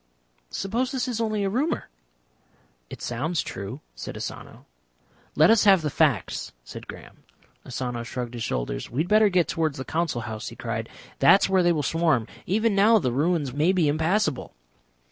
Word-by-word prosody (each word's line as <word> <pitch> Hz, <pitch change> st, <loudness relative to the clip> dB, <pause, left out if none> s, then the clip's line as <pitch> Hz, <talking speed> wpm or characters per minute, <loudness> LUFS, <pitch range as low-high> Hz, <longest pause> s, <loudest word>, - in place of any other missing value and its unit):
"Suppose 235 Hz, -, -2 dB
this 265 Hz, -2 st, -2 dB
is 235 Hz, -2 st, -2 dB
only 215 Hz, -2 st, 0 dB
a 195 Hz, -, +1 dB
rumour?" 280 Hz, +9 st, -1 dB, 1.0 s
"It -, -, -9 dB
sounds 150 Hz, +8 st, -1 dB
true," 100 Hz, +1 st, -7 dB
said -, -, -7 dB
Asano. -, -, -8 dB, 0.7 s
"Let 155 Hz, +7 st, +6 dB
us 225 Hz, -2 st, +4 dB
have 190 Hz, -5 st, +6 dB
the 150 Hz, -, -1 dB
facts," 140 Hz, -, 0 dB
said -, -, -10 dB
Graham. -, -, -11 dB, 0.5 s
Asano 125 Hz, -2 st, -3 dB
shrugged 120 Hz, 0 st, -5 dB
his 120 Hz, -, -6 dB
shoulders. 60 Hz, -, -3 dB
"We 130 Hz, +6 st, -1 dB
had 170 Hz, -, -2 dB
better 215 Hz, +1 st, +5 dB
get 180 Hz, -3 st, +2 dB
towards 160 Hz, -3 st, -1 dB
the 130 Hz, -, -5 dB
Council 160 Hz, -6 st, -1 dB
House," 110 Hz, -2 st, -6 dB
he -, -, -7 dB
cried. -, -, -4 dB, 0.3 s
"That 195 Hz, -, +6 dB
is -, -, +1 dB
where 190 Hz, -1 st, +4 dB
they 175 Hz, 0 st, +4 dB
will 155 Hz, -3 st, 0 dB
swarm. 160 Hz, -6 st, +1 dB, 0.2 s
Even 220 Hz, +4 st, +2 dB
now 210 Hz, +3 st, +5 dB
the 130 Hz, -, 0 dB
ruins 145 Hz, 0 st, 0 dB
may 155 Hz, +6 st, +3 dB
be 180 Hz, -5 st, +2 dB
impassable." 160 Hz, -, 0 dB
165 Hz, 180 wpm, -25 LUFS, 130-200 Hz, 1.0 s, Let